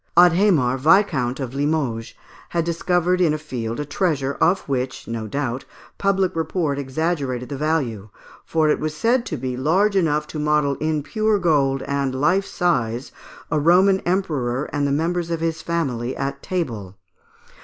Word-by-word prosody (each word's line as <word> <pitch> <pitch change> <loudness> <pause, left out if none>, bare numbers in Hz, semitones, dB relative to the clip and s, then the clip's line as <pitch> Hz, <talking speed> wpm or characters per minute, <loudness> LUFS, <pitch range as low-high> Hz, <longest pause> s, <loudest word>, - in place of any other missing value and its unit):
Adhémar, 175 -8 +5
Viscount 150 -6 +3
of 130 -2 -4
Limoges, 140 -6 -1 0.3
had 170 -1 -1
discovered 175 +1 +1
in 155 -4 +3
a - - -2
field 120 -7 -5
a 150 - -2
treasure, 145 -4 0
of 190 +2 +3
which, 130 -1 -3
no 115 -1 -4
doubt, 130 +1 -3 0.4
public 195 -2 +1
report 160 -3 -1
exaggerated 135 -3 -2
the 140 - -4
value, 135 -9 -1 0.3
for 160 -1 +1
it 150 - +2
was 155 0 -3
said 235 +6 +1
to - - -3
be 130 0 -3
large 185 +10 +2
enough 150 -5 +2
to 150 - -6
model 150 -1 +2
in 155 -1 -1
pure 215 +4 +1
gold, 140 -7 +2
and 140 -2 -1
life 185 +7 +2
size, 125 -8 -1 0.4
a 150 - +2
Roman 185 +5 +5
emperor 150 -9 -1
and 145 -1 +1
the - - -1
members 170 +3 0
of 165 -1 -1
his 165 0 -2
family, 130 -8 -2
at 140 0 -3
table. 115 - -4
150 Hz, 160 wpm, -22 LUFS, 130-175 Hz, 0.4 s, Adhémar